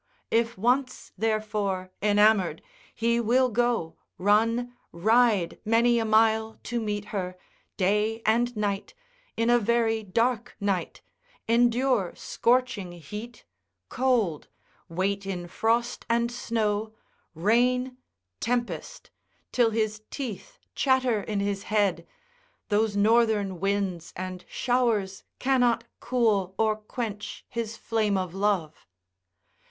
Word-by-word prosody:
If 230 Hz, 0 st, +1 dB
once, 250 Hz, +6 st, 0 dB
therefore, 210 Hz, -3 st, -1 dB
enamoured, 210 Hz, -2 st, +3 dB, 0.3 s
he 235 Hz, +1 st, +1 dB
will 250 Hz, +3 st, +3 dB
go, 240 Hz, -8 st, 0 dB, 0.2 s
run, 230 Hz, +5 st, +2 dB, 0.2 s
ride 215 Hz, -1 st, +2 dB
many 235 Hz, +2 st, +3 dB
a 225 Hz, -, 0 dB
mile 220 Hz, 0 st, +3 dB
to 240 Hz, -1 st, -2 dB
meet 205 Hz, -1 st, -3 dB
her, 185 Hz, -2 st, -3 dB, 0.4 s
day 210 Hz, +4 st, +1 dB
and 235 Hz, +2 st, +2 dB
night, 205 Hz, -, -2 dB, 0.4 s
in 230 Hz, +1 st, +2 dB
a 240 Hz, -, +5 dB
very 225 Hz, 0 st, +1 dB
dark 230 Hz, +4 st, -1 dB
night, 195 Hz, -4 st, -2 dB, 0.4 s
endure 240 Hz, -3 st, +2 dB
scorching 235 Hz, -7 st, 0 dB
heat, 210 Hz, +8 st, -9 dB, 0.4 s
cold, 240 Hz, -, +1 dB, 0.4 s
wait 195 Hz, +3 st, -1 dB
in 175 Hz, -3 st, -4 dB
frost 230 Hz, +6 st, 0 dB
and 235 Hz, +1 st, +1 dB
snow, 220 Hz, -2 st, -1 dB, 0.4 s
rain, 250 Hz, +7 st, +2 dB, 0.4 s
tempest, 245 Hz, -, -3 dB, 0.4 s
till 240 Hz, -2 st, +3 dB
his 215 Hz, -1 st, -1 dB
teeth 240 Hz, -9 st, -6 dB, 0.2 s
chatter 260 Hz, -5 st, +2 dB
in 200 Hz, 0 st, -2 dB
his 200 Hz, -1 st, -1 dB
head, 200 Hz, -5 st, +1 dB, 0.6 s
those 210 Hz, 0 st, +1 dB
northern 210 Hz, -3 st, +3 dB
winds 195 Hz, -3 st, -1 dB
and 185 Hz, 0 st, -6 dB
showers 230 Hz, -6 st, 0 dB
cannot 245 Hz, -3 st, +2 dB, 0.2 s
cool 210 Hz, -7 st, +1 dB
or 220 Hz, -1 st, +2 dB
quench 215 Hz, -1 st, -6 dB
his 230 Hz, -1 st, -4 dB
flame 215 Hz, -3 st, 0 dB
of 185 Hz, -2 st, -3 dB
love. 195 Hz, -6 st, -1 dB
220 Hz, 110 wpm, -27 LUFS, 200-235 Hz, 0.6 s, a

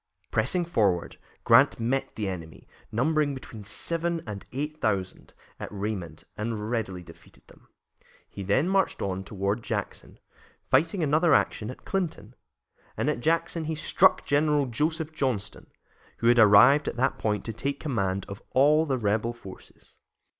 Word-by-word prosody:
Pressing 140 Hz, +11 st, +1 dB
forward, 100 Hz, -, 0 dB, 0.2 s
Grant -, -, +5 dB
met 125 Hz, +4 st, -1 dB
the 105 Hz, -2 st, -3 dB
enemy, 85 Hz, -4 st, -7 dB, 0.2 s
numbering 145 Hz, +4 st, +1 dB
between 115 Hz, -5 st, -9 dB
seven 165 Hz, +11 st, -1 dB
and 105 Hz, -3 st, -7 dB
eight 150 Hz, +4 st, -5 dB
thousand, 95 Hz, -4 st, -2 dB, 0.2 s
at -, -, -7 dB
Raymond, 100 Hz, -6 st, -5 dB
and 110 Hz, 0 st, -4 dB
readily 95 Hz, -7 st, -3 dB
defeated 85 Hz, -1 st, -17 dB
them. -, -, -20 dB, 0.6 s
He -, -, -9 dB
then 100 Hz, -, +1 dB
marched 195 Hz, 0 st, +1 dB
on 95 Hz, -1 st, -3 dB
toward 100 Hz, +3 st, -2 dB
Jackson, -, -, -5 dB, 0.5 s
fighting 165 Hz, +7 st, +1 dB
another 155 Hz, +3 st, +4 dB
action 105 Hz, -, 0 dB
at 130 Hz, -, -10 dB
Clinton, 160 Hz, -, -3 dB, 0.6 s
and -, -, +1 dB
at -, -, -4 dB
Jackson 165 Hz, +3 st, 0 dB
he 160 Hz, +1 st, -2 dB
struck 185 Hz, +4 st, +3 dB
General 145 Hz, 0 st, +2 dB
Joseph 155 Hz, +5 st, -2 dB
Johnston, 125 Hz, -9 st, -3 dB, 0.5 s
who -, -, -5 dB
had 120 Hz, 0 st, +5 dB
arrived 110 Hz, +8 st, +7 dB
at -, -, -2 dB
that 130 Hz, +2 st, 0 dB
point 105 Hz, -2 st, -1 dB
to 115 Hz, -, -4 dB
take 140 Hz, +5 st, -3 dB
command 100 Hz, -, -2 dB
of 100 Hz, 0 st, -8 dB
all 150 Hz, +4 st, +4 dB
the 135 Hz, -2 st, 0 dB
rebel 110 Hz, +1 st, 0 dB
forces. 100 Hz, -5 st, -14 dB
120 Hz, 150 wpm, -27 LUFS, 100-150 Hz, 0.6 s, arrived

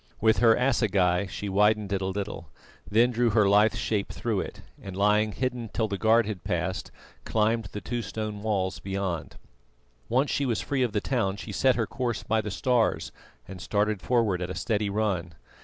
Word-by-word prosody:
With 110 Hz, 0 st, +3 dB
her 115 Hz, -1 st, +6 dB
assegai 100 Hz, -8 st, +2 dB
she 105 Hz, -, -5 dB
widened 105 Hz, +1 st, +2 dB
it 95 Hz, -, 0 dB
a 95 Hz, -, -1 dB
little, 95 Hz, -4 st, -4 dB, 0.4 s
then 115 Hz, +4 st, +4 dB
drew 120 Hz, 0 st, +2 dB
her 105 Hz, -1 st, +3 dB
lithe 105 Hz, +2 st, +4 dB
shape 105 Hz, -3 st, -1 dB
through 110 Hz, -4 st, -2 dB
it, -, -, -6 dB, 0.2 s
and 95 Hz, -1 st, -8 dB
lying 105 Hz, +2 st, +3 dB
hidden 125 Hz, -1 st, -3 dB
till 110 Hz, -2 st, 0 dB
the 100 Hz, -2 st, -4 dB
guard 115 Hz, +1 st, +4 dB
had 100 Hz, -4 st, -5 dB
passed, -, -, -2 dB, 0.3 s
climbed 110 Hz, +1 st, +1 dB
the 105 Hz, +2 st, -7 dB
two 120 Hz, 0 st, -3 dB
stone 110 Hz, -2 st, -5 dB
walls 100 Hz, -4 st, -1 dB
beyond. 95 Hz, -4 st, -3 dB, 0.7 s
Once 130 Hz, +5 st, +2 dB
she 140 Hz, -, 0 dB
was 115 Hz, -3 st, 0 dB
free 140 Hz, -2 st, -1 dB
of 120 Hz, -4 st, 0 dB
the 105 Hz, -, 0 dB
town, 100 Hz, -7 st, -1 dB
she 105 Hz, -, -7 dB
set 130 Hz, +5 st, +3 dB
her 115 Hz, -, 0 dB
course 120 Hz, 0 st, -3 dB
by 110 Hz, 0 st, +1 dB
the 105 Hz, -, -5 dB
stars 115 Hz, +4 st, +1 dB, 0.4 s
and 95 Hz, -1 st, -9 dB
started 105 Hz, -1 st, 0 dB
forward 110 Hz, -7 st, +1 dB
at 90 Hz, -, -3 dB
a 95 Hz, -, -4 dB
steady 105 Hz, -2 st, -1 dB
run. 100 Hz, -6 st, -1 dB
105 Hz, 190 wpm, -27 LUFS, 100-115 Hz, 0.7 s, her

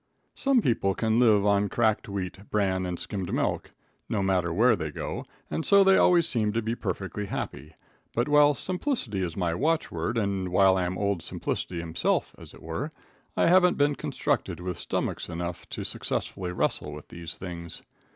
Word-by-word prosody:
Some 270 Hz, -5 st, +2 dB
people 100 Hz, -5 st, +1 dB
can 110 Hz, 0 st, +1 dB
live 110 Hz, -4 st, +5 dB
on 100 Hz, 0 st, +3 dB
cracked 110 Hz, -3 st, +1 dB
wheat, 100 Hz, 0 st, -5 dB
bran 95 Hz, -3 st, +1 dB
and 90 Hz, -1 st, -3 dB
skimmed 95 Hz, 0 st, -4 dB
milk, -, -, -1 dB, 0.4 s
no 100 Hz, -3 st, 0 dB
matter 90 Hz, -3 st, +1 dB
where 115 Hz, +8 st, +4 dB
they 80 Hz, -, -4 dB
go, 75 Hz, -, -5 dB, 0.3 s
and 160 Hz, -, -1 dB
so 200 Hz, +2 st, +6 dB
they 195 Hz, 0 st, +6 dB
always 175 Hz, -3 st, +5 dB
seem 110 Hz, -7 st, +1 dB
to 115 Hz, -, +1 dB
be 110 Hz, +1 st, -1 dB
perfectly 100 Hz, -1 st, -4 dB
happy; 95 Hz, -, -5 dB, 0.4 s
but, 120 Hz, +3 st, +1 dB
while 145 Hz, 0 st, +5 dB
simplicity 180 Hz, -, -1 dB
is 85 Hz, -3 st, -3 dB
my 85 Hz, -3 st, 0 dB
watchword, 115 Hz, -, 0 dB
and 100 Hz, -4 st, -1 dB
while 95 Hz, +1 st, +5 dB
I 90 Hz, -1 st, +1 dB
am 90 Hz, +1 st, -3 dB
Old 100 Hz, -3 st, 0 dB
Simplicity 85 Hz, +2 st, -4 dB
himself, 85 Hz, -1 st, 0 dB
as -, -, -12 dB
it -, -, -15 dB
were, -, -, -3 dB, 0.5 s
I -, -, +4 dB
haven't 180 Hz, 0 st, +5 dB
been 145 Hz, 0 st, +3 dB
constructed -, -, -2 dB
with 90 Hz, -1 st, -4 dB
stomachs -, -, -2 dB
enough 85 Hz, 0 st, -5 dB
to -, -, -4 dB
successfully 90 Hz, -2 st, -3 dB
wrestle 75 Hz, -3 st, -1 dB
with 75 Hz, 0 st, -10 dB
these 85 Hz, 0 st, -7 dB
things. 85 Hz, -2 st, -7 dB
100 Hz, 180 wpm, -27 LUFS, 90-120 Hz, 0.5 s, so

